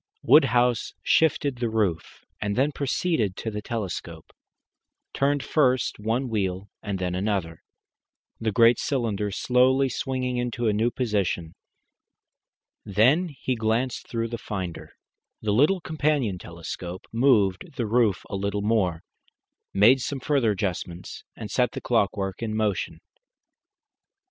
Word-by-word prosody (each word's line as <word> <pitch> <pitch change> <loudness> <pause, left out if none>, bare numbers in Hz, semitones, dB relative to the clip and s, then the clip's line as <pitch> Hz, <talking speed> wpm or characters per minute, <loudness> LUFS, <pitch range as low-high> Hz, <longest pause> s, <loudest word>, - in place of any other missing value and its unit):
Woodhouse 125 -5 +4
shifted 145 -4 +2
the 120 -1 -1
roof, 105 -7 -2 0.2
and 100 -1 -1
then 140 +4 +2
proceeding 140 - 0
to 110 +3 -5
the 105 0 -4
telescope, 95 -7 -5 0.8
turned 140 0 +1
first 130 -8 +1
one 115 +5 -1
wheel 100 -3 -2
and 100 -3 -3
then 90 -1 -2
another, 90 -4 -2 0.8
the 110 -1 0
great 115 +2 +5
cylinder 110 -7 -1
slowly 130 +5 +3
swinging 130 0 -2
into 120 -1 -1
a 105 - +3
new 110 +3 +2
position. 100 -9 -1 1.3
Then 125 - +3
he 130 -3 -3
glanced 115 +2 -1
through 115 -1 -2
the 115 0 -5
finder, 95 -7 -6 0.5
the 105 -1 -1
little 150 - +4
companion 145 - 0
telescope, 85 +2 -7
moved 115 - +2
the 120 - -1
roof 110 -3 +2
a - - -5
little 100 +1 -2
more, 95 -7 +1 0.7
made 115 +7 +5
some 140 +2 -3
further 135 -3 +1
adjustments, 90 -3 -4
and 105 -3 -7
set 125 0 +1
the - - -4
clockwork 100 -4 0
in 110 -2 -2
motion. 105 -3 -1
110 Hz, 130 wpm, -25 LUFS, 100-125 Hz, 1.3 s, great